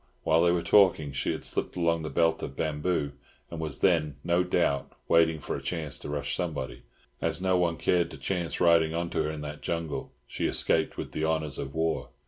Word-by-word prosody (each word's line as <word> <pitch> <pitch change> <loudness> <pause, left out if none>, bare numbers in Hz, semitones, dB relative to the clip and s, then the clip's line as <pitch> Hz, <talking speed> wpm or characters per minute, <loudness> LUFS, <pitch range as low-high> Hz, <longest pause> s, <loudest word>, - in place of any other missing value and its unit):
While 80 +1 +4
they 85 0 +4
were 85 -1 0
talking 90 -8 +4
she 70 - -1
had - - -5
slipped - - -3
along 85 -2 +1
the 80 - -4
belt 80 +3 +2
of 65 - -5
bamboos, 75 0 -1 0.4
and 85 - -5
was 75 -4 -4
then, 75 -6 +3
no 85 +1 +2
doubt, 85 -6 0
waiting 80 -1 +4
for - - -4
a - - -5
chance 75 -6 -2
to - - -7
rush 75 -1 -1
somebody. - - -4 0.4
As - - 0
no 95 0 +2
one 85 -2 +1
cared 85 -2 +2
to - - -9
chance 85 +4 -2
riding 85 -2 +4
on 85 0 -2
to - - 0
her 75 - -1
in 75 -1 -5
that 75 0 -7
jungle, 85 -2 -3
she - - -2
escaped 80 -1 +1
with - - -5
the 75 - -3
honours 80 -3 0
of 70 +1 -5
war. 80 0 -1
80 Hz, 215 wpm, -28 LUFS, 75-85 Hz, 0.4 s, While